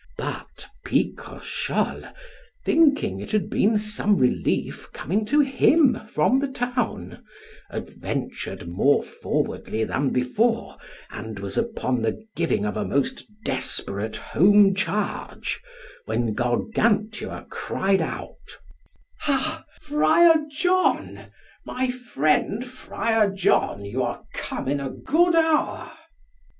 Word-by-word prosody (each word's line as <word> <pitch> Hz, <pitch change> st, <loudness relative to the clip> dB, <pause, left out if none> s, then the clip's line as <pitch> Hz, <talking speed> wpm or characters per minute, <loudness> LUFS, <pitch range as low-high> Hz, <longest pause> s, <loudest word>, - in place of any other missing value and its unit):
But -, -, -6 dB, 0.2 s
Picrochole, -, -, -2 dB, 0.5 s
thinking 285 Hz, -, +3 dB
it 100 Hz, -, -7 dB
had 215 Hz, -2 st, 0 dB
been 215 Hz, +2 st, +3 dB
some 210 Hz, -1 st, +1 dB
relief 125 Hz, -, 0 dB
coming 205 Hz, +7 st, -1 dB
to 290 Hz, +7 st, +4 dB
him 275 Hz, +1 st, +4 dB
from 215 Hz, -, +2 dB
the 280 Hz, -, 0 dB
town, 245 Hz, -, -3 dB, 0.5 s
adventured -, -, -5 dB
more 100 Hz, +12 st, +3 dB
forwardly 110 Hz, -, -2 dB
than 135 Hz, +4 st, 0 dB
before, 225 Hz, -, 0 dB, 0.3 s
and 110 Hz, -2 st, -7 dB
was 100 Hz, 0 st, -5 dB
upon 130 Hz, -, -1 dB
the 110 Hz, 0 st, -1 dB, 0.2 s
giving 165 Hz, -11 st, 0 dB
of 105 Hz, -, -2 dB
a -, -, 0 dB
most 140 Hz, -1 st, -1 dB, 0.2 s
desperate 100 Hz, +3 st, -1 dB
home 200 Hz, +3 st, +5 dB
charge, 200 Hz, +2 st, -2 dB, 0.4 s
when 115 Hz, -, -1 dB
Gargantua 210 Hz, -, 0 dB
cried 195 Hz, 0 st, 0 dB
out, -, -, -6 dB, 0.6 s
Ha, 310 Hz, +2 st, 0 dB, 0.2 s
Friar 315 Hz, +3 st, +5 dB
John, 360 Hz, +5 st, +1 dB, 0.4 s
my 255 Hz, 0 st, -1 dB
friend 230 Hz, -, 0 dB
Friar 230 Hz, -4 st, 0 dB
John, 190 Hz, -, +1 dB
you 120 Hz, +6 st, -2 dB
are 120 Hz, -1 st, -3 dB
come -, -, -4 dB
in 140 Hz, +1 st, 0 dB
a 135 Hz, -1 st, -3 dB
good 335 Hz, -, +2 dB
hour. 320 Hz, -2 st, +1 dB
210 Hz, 110 wpm, -24 LUFS, -, 0.6 s, home